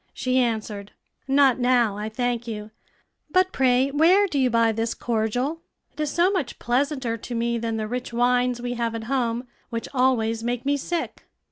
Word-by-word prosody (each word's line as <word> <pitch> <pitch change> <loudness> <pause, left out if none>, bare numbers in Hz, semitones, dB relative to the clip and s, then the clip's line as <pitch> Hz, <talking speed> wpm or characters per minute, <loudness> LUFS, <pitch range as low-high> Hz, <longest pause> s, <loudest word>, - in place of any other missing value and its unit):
She 255 0 +1
answered, 215 -4 -2 0.3
"Not 270 -2 +4
now, 245 -4 +3
I 210 +1 -4
thank 240 +1 -2
you; 215 -1 -6 0.6
but 370 +3 +3
pray 260 +1 +3
where 345 +8 +5
do 300 -8 -1
you 260 -1 +3
buy 230 -1 +3
this 225 +1 -2
cordial? 245 +7 -1 0.3
it - - -21
is 300 -1 0
so 345 +5 +2
much 345 -11 -2
pleasanter 255 -1 -1
to 240 +2 -7
me 235 0 0
than 225 -1 -2
the 215 -1 -2
rich 250 +2 -4
wines 245 +1 +2
we 245 0 -3
have 235 -1 -2
at 225 - -4
home, 240 -1 -1 0.2
which 230 -1 -4
always 230 -4 +1
make 245 +1 -2
me 285 +1 +2
sick." 330 +4 -4
245 Hz, 180 wpm, -24 LUFS, 230-270 Hz, 0.6 s, where